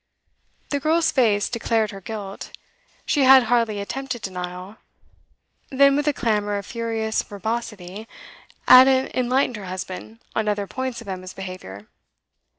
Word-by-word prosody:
The 285 - 0
girl's 320 +3 +2
face 215 -6 +2
declared 225 -2 0
her 195 -1 -9
guilt; 200 -1 -7 0.5
she 290 - +1
had 265 -1 +8
hardly 230 -3 +1
attempted 245 +4 -5
denial. 180 +2 -6 0.9
Then, 275 +1 +4
with 290 +1 -1
a - - +5
clamour 210 -5 -1
of 200 - -6
furious 225 -1 -2
verbosity, 210 -2 -5 0.6
Ada 260 +1 +7
enlightened 255 -1 +1
her 200 - -8
husband 185 +4 -7 0.2
on 220 -1 0
other 205 -1 0
points 260 +2 -4
of 230 - -13
Emma's 185 -1 -6
behaviour. 185 - -8
220 Hz, 135 wpm, -23 LUFS, 195-255 Hz, 0.9 s, had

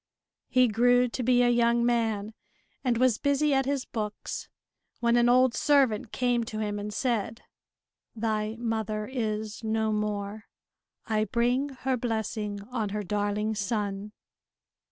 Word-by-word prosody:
He 255 -1 +4
grew 245 +3 +4
to 250 - -4
be 245 0 +4
a 245 - +4
young 235 0 +3
man, 225 -3 0 0.5
and 245 -3 +1
was 250 -2 +3
busy 285 +1 +2
at 270 -1 +2
his 275 -2 -1
books 210 -2 -5 0.5
when 235 0 +2
an 240 0 +4
old 255 0 +5
servant 260 -7 +2
came 245 -2 +1
to 220 - -6
him 205 -1 -2
and 210 +1 -5
said: 230 -1 -2 0.7
"Thy 215 -1 -1
mother 220 -2 -2
is 215 -3 -3
no 220 0 0
more. 210 0 -3 0.6
I 215 -1 +1
bring 245 +6 +1 0.2
her 260 -1 +2
blessing 220 -3 -3
on 225 -5 -1
her 210 +1 -3
darling 205 +2 -1
son!" 205 -1 -3
225 Hz, 140 wpm, -28 LUFS, 210-245 Hz, 0.7 s, old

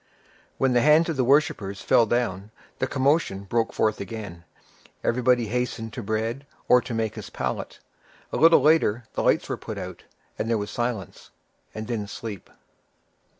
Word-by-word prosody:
When 135 -1 +2
the 120 - +4
hands 155 +5 +5
of 165 - -1
the 130 - +1
worshippers 135 - +1
fell 115 - +4
down, 105 -4 -1 0.3
the 130 - 0
commotion 135 -7 +1
broke 115 +3 0
forth 110 -2 0
again; 100 -4 -7 0.6
everybody 125 0 +2
hastened 115 -2 -2
to 125 - -5
bread, 115 +6 -3 0.2
or 125 - +6
to 120 - -5
make 110 -1 -1
his - - -8
pallet. - - -4 0.6
A - - 0
little 165 -1 +6
later, 135 -6 +3
the - - -1
lights - - +2
were - - -3
put - - -7
out, - - -7 0.3
and 110 - -1
there 115 - +2
was 105 -1 -4
silence, 120 -5 -4 0.5
and 110 0 -5
then 110 -3 -3
sleep. 105 -1 -7
115 Hz, 165 wpm, -25 LUFS, 110-130 Hz, 0.6 s, or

